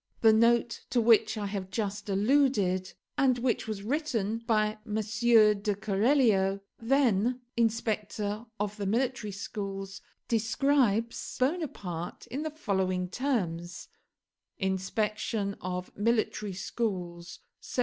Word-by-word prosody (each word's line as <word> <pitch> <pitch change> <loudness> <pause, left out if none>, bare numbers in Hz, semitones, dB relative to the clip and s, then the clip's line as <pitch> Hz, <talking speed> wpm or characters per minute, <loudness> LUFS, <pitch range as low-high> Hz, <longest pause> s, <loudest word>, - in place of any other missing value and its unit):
The 225 -1 +7
note 235 +1 +3
to 245 - +2
which 225 -1 +4
I 210 - -2
have 195 -2 -4
just 205 +1 -3
alluded, 200 -4 +2 0.3
and 260 -2 +4
which 240 -2 0
was 210 -2 -4
written 230 -5 -1
by 215 -2 +1
M. 215 -2 -5
de 220 - +1 0.7
Keralio, 205 -1 +2 0.2
then 245 -1 +2
inspector 215 -1 -1
of 205 +1 -2
the 200 -2 -3
military 235 0 0
schools, 195 0 -5 0.3
describes 230 0 +1
Bonaparte 255 - -2
in 270 +4 -2
the 315 - -2
following 190 - -1
terms: 180 -8 -2 0.7
INSPECTION 200 +1 -1
OF 180 0 -5
MILITARY 215 -2 0
SCHOOLS 180 -4 -4 0.2
1784. - - -6
215 Hz, 110 wpm, -29 LUFS, 195-235 Hz, 0.7 s, The